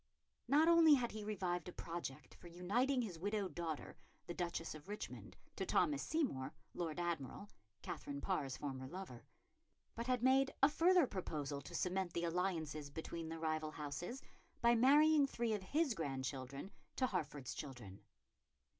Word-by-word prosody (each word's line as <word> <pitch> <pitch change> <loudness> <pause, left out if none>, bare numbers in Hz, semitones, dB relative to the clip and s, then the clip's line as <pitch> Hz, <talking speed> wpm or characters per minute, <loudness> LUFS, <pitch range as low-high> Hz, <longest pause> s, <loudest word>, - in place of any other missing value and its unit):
Not 295 +5 +5
only 335 -3 +8
had 245 -3 0
he 215 -1 -5
revived 180 -4 -2
a - - -6
project 150 -7 -6
for - - -13
uniting 235 +10 +1
his 180 -7 -5
widowed 205 +1 -1
daughter, 165 -3 -4 0.3
the 175 - -4
Duchess 170 -2 -2
of 155 +4 -11
Richmond, 210 - -6 0.2
to - - -1
Thomas 290 -2 +2
Seymour, 160 - -1 0.2
Lord 165 -2 -3
Admiral, 170 +1 -3 0.4
Katherine 140 0 -4
Parr's 135 -1 -1
former 130 -2 -4
lover, 175 -6 -8 0.7
but 235 +1 -4
had 250 -2 +1
made 270 +1 +4
a 275 - +9
further 350 +2 +5
proposal 150 - -3
to - - -9
cement 185 -1 0
the 170 - -1
alliance 170 -2 0 0.2
between 160 +2 -5
the 165 - -4
rival 155 -1 -1
houses 155 - -5 0.4
by 235 0 +5
marrying 290 +4 +6
three 235 -4 -1
of 210 - -1
his 285 - +1
grandchildren 135 0 -4 0.2
to 260 - +2
Hertford's 150 - -3
children. 120 -9 -8
175 Hz, 155 wpm, -39 LUFS, 150-240 Hz, 0.7 s, a